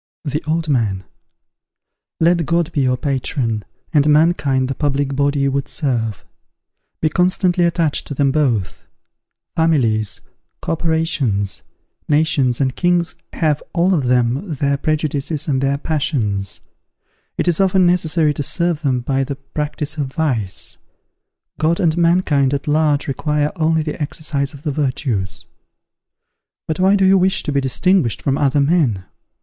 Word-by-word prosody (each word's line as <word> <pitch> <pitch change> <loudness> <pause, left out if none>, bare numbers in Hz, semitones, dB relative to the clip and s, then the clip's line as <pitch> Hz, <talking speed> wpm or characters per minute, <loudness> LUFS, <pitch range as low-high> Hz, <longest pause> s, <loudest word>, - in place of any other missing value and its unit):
The 150 +2 -2
Old 160 +1 0
Man. 110 -9 0 1.2
Let 170 -1 +2
God 170 -1 +1
be 145 - 0
your 125 -1 +1
patron, 125 -5 -2 0.3
and 150 -1 +4
mankind 150 -4 +3
the 135 - -2
public 140 0 -1
body 140 0 +1
you 140 0 +2
would 140 0 -2
serve. 115 - -2 0.8
Be 155 - +2
constantly 180 +1 +2
attached 165 -3 0
to 145 - -5
them 140 0 +2
both. 125 - 0 0.7
Families, 120 -10 +1 0.4
corporations, 160 - -1 0.5
nations 145 -5 +2
and 130 -2 0
kings 175 -1 +1 0.2
have, 150 -3 0
all 180 +2 +2
of 150 -7 +1
them, 125 - +1
their 140 +1 +1
prejudices 150 0 -1
and 135 -3 +1
their 140 0 +1
passions; 115 - -2 0.8
it - - -1
is 170 -3 +2
often 190 -1 +3
necessary 165 -3 +2
to 145 - -4
serve 170 +1 0
them 130 -5 0
by 135 +2 0
the 140 +1 -4
practice 150 +2 -5
of 145 -2 -1
vice: 130 -9 -2 0.8
God 165 +3 +1
and 165 -5 +2
mankind 165 -6 +2
at 140 - -5
large 150 -1 +2
require 150 +2 0
only 160 -1 +1
the 150 +1 -5
exercise 145 -2 -2
of 140 - -14
the 150 - -1
virtues. 130 - -2 1.2
But 160 +1 -2
why 190 +2 +4
do 195 -1 +3
you 190 0 +5
wish 190 +1 +1
to - - -2
be 140 -1 +1
distinguished 145 - +1
from 135 - +1
other 145 0 +2
men? 140 - +1
145 Hz, 145 wpm, -19 LUFS, 135-165 Hz, 1.2 s, you